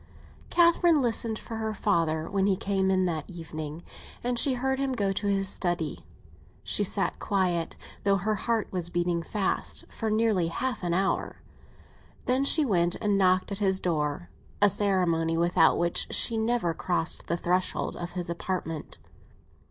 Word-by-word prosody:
XI - - -9
CATHERINE 340 -2 +5
listened 230 -3 0
for 225 - -7
her 220 -1 -3
father 165 -6 0
when 195 0 +1
he 195 - +3
came 195 0 0
in 185 -1 +2
that 160 -4 -3
evening, 160 -2 -7 0.4
and 245 0 +1
she 265 0 +4
heard 265 +2 -1
him 275 -1 0
go 200 -5 0
to 200 +1 -2
his 195 -1 +2
study. 175 -4 -2 0.6
She - - 0
sat - - 0
quiet, 180 -5 0 0.3
though 200 -1 +3
her 210 +3 -1
heart 225 +1 -1
was 175 -2 -2
beating 175 0 0
fast, 195 +4 -1
for 225 - -3
nearly 215 -5 +2
half 250 +9 -3
an 175 -1 -1
hour; 195 +1 -1 0.8
then 255 +2 +2
she 300 +2 +4
went 175 -6 +2
and 205 -2 0
knocked 185 0 +2
at 200 - -4
his 190 -2 +1
door—a 170 +4 -1
ceremony 170 -5 +1
without 170 -1 +4
which 170 0 +1
she 230 - +3
never 220 -6 0
crossed 175 -1 -1
the 170 - 0
threshold 180 +2 -1
of 175 +1 -7
this 180 -1 -3
apartment. 170 -2 -4
190 Hz, 160 wpm, -27 LUFS, 170-220 Hz, 0.8 s, CATHERINE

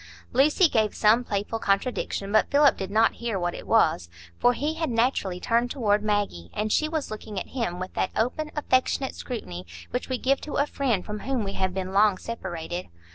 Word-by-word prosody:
Lucy 295 - +5
gave 220 -7 +1
some 225 +3 +4
playful 210 0 -2
contradiction, 200 -1 -1
but 215 - +3
Philip 285 0 +5
did 190 - -5
not 220 +2 +3
hear 230 -4 -1
what 175 -1 -1
it - - -9
was, 155 - +3 0.3
for 245 - +4
he 295 +5 -1
had 320 -1 -2
naturally 230 -6 0
turned 235 +5 +1
toward 210 -6 +1
Maggie, 205 - -1
and 210 +1 -1
she 310 - +2
was 315 -6 -3
looking 215 -2 -5
at - - -8
him 230 -9 -2
with 185 0 -5
that - - 0
open, 255 +7 -1
affectionate 265 -2 +1
scrutiny 90 - -6 0.3
which 250 - -3
we 255 - 0
give 270 +2 +1
to 300 - -7
a 285 - +3
friend 255 -10 -1
from 210 0 -5
whom 255 0 -1
we 195 -1 -4
have 190 -1 -1
been 190 0 -3
long 205 -1 +4
separated. 180 -6 -5
220 Hz, 200 wpm, -26 LUFS, 195-255 Hz, 0.3 s, Lucy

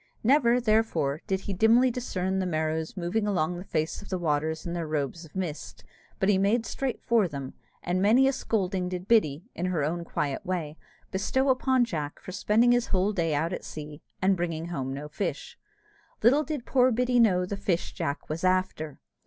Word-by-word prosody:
Never, 250 -1 +4
therefore, 215 - +1
did 190 -1 0
he 200 - -4
dimly 230 +6 +4
discern 190 -6 -2
the 185 - -1
Merrows 160 +1 -2
moving 190 +5 -1
along 175 -4 0
the - - -7
face 160 -2 -2
of 205 - -12
the 185 - -1
waters 160 -1 -1
in 170 - -3
their 170 -2 -3
robes 155 +2 -3
of 160 - -18
mist, 170 -6 -5 0.4
but 190 - +1
he 200 -2 +4
made 210 +4 +2
direct 260 +2 -3
for 230 -5 +3
them; 140 -4 -6 0.3
and 180 +1 0
many 235 +7 +5
a 270 - +2
scolding 190 -6 -1
did 180 +1 -5
Biddy, 165 -9 +3
in 175 +2 -2
her 170 -5 0
own 170 +4 -1
quiet 145 -4 -2
way, 170 -5 -3 0.4
bestow 265 +8 +1
upon 260 -1 +3
Jack 150 -9 -4
for - - -9
spending 220 +5 +3
his 245 0 +2
whole 195 +2 +1
day 165 -5 0
out 165 +5 0
at - - -5
sea, 150 0 -8 0.2
and 190 +1 +4
bringing 170 -2 -3
home 135 -6 -3
no 140 +2 -5
fish. 150 - -4 0.7
Little 270 +7 +5
did 300 -5 -4
poor 255 -1 +4
Biddy 245 +1 +2
know 185 -6 +4
the 200 - -4
fish 185 -3 -1
Jack 140 +2 -3
was 155 +3 -4
after! 185 -5 0
185 Hz, 195 wpm, -27 LUFS, 160-225 Hz, 0.7 s, many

